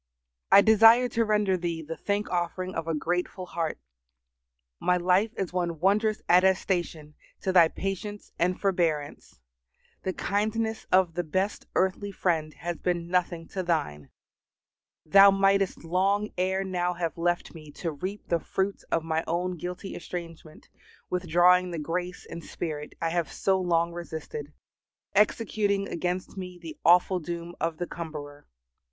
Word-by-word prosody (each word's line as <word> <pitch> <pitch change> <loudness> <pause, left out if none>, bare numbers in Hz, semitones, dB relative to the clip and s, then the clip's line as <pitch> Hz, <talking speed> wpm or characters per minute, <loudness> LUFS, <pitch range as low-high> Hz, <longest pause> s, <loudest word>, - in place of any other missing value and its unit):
I 200 - +9
desire 225 +3 +7
to 230 - +1
render 210 -3 +2
Thee 170 -2 -3
the 165 +2 -6
thank 205 +3 -2
offering 180 +1 -2
of 165 0 -4
a 165 - 0
grateful 180 +4 -2
heart. 165 -3 -3 1.0
My 180 - +2
life 185 +5 +2
is 190 -3 -3
one 170 -3 -1
wondrous 210 +4 +2
attestation 180 -4 +2 0.3
to 190 - 0
Thy 175 -3 +7
patience 195 +3 -5
and 180 +2 +1
forbearance. 165 -7 -1 0.6
The 190 - -2
kindness 220 +3 -1
of 185 -2 +4
the 175 - -1
best 185 +6 -2
earthly 190 +2 0
friend 165 -5 0
has 170 +2 -4
been 175 -1 -1
nothing 175 -2 0
to 190 - -3
Thine. 150 - -2 1.0
Thou 195 +5 +8
mightest 195 -1 +2
long 195 +5 +1
ere 190 +1 0
now 180 -2 -1
have 170 -2 -2
left 175 +1 -1
me 155 -3 -11
to 165 +2 -3
reap 185 +8 -6
the 170 - +1
fruits 195 +4 -2
of 165 - +1
my 160 0 -1
own 180 +2 -1
guilty 180 +3 -6
estrangement, 165 -3 -8 0.4
withdrawing 180 +1 +4
the 170 - -4
grace 175 +4 -4
and 170 0 -8
Spirit 150 -3 -5
I 165 - +1
have 170 -1 -1
so 190 -1 +1
long 170 -1 +1
resisted, 160 -3 -6 0.6
executing 205 -1 +1
against 180 +3 -3
me 180 -1 -6
the 165 -2 -8
awful 180 +3 +5
doom 170 +1 -6
of 165 -1 -1
the 175 - -2
cumberer. 150 -4 -8
180 Hz, 145 wpm, -27 LUFS, 165-195 Hz, 1.0 s, I